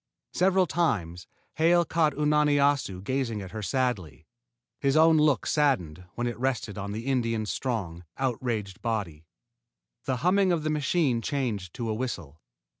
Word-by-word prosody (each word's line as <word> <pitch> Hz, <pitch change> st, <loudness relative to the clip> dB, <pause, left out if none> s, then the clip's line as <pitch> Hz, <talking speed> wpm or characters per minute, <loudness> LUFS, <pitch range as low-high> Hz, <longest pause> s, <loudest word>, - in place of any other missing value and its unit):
Several 190 Hz, 0 st, +3 dB
times 95 Hz, -, -1 dB, 0.3 s
Hale 170 Hz, +2 st, +4 dB
caught 160 Hz, -2 st, +1 dB
Unani 150 Hz, 0 st, +3 dB
Assu 140 Hz, -10 st, +1 dB
gazing 130 Hz, -2 st, -1 dB
at 95 Hz, -, -9 dB
her 110 Hz, -, -5 dB
sadly, 100 Hz, -, -2 dB, 0.5 s
and 140 Hz, -, -1 dB
his 135 Hz, +2 st, +3 dB
own 160 Hz, 0 st, +6 dB
look 150 Hz, -3 st, +3 dB
saddened 90 Hz, -, 0 dB
when 120 Hz, -, -2 dB
it 120 Hz, -2 st, -3 dB
rested 125 Hz, -5 st, -1 dB
on 100 Hz, -1 st, -5 dB
the 110 Hz, +3 st, -5 dB
Indian's 115 Hz, -5 st, 0 dB
strong, 95 Hz, -10 st, -3 dB
outraged 115 Hz, -7 st, -2 dB
body. 100 Hz, -10 st, -3 dB, 0.8 s
The 130 Hz, -1 st, 0 dB
humming 190 Hz, +1 st, +4 dB
of 165 Hz, -3 st, 0 dB
the 155 Hz, -, 0 dB
machine 145 Hz, -4 st, +1 dB
changed 115 Hz, -, -3 dB
to 120 Hz, -, -4 dB
a 110 Hz, -, 0 dB
whistle. 85 Hz, -, -5 dB
125 Hz, 155 wpm, -27 LUFS, 100-150 Hz, 0.8 s, own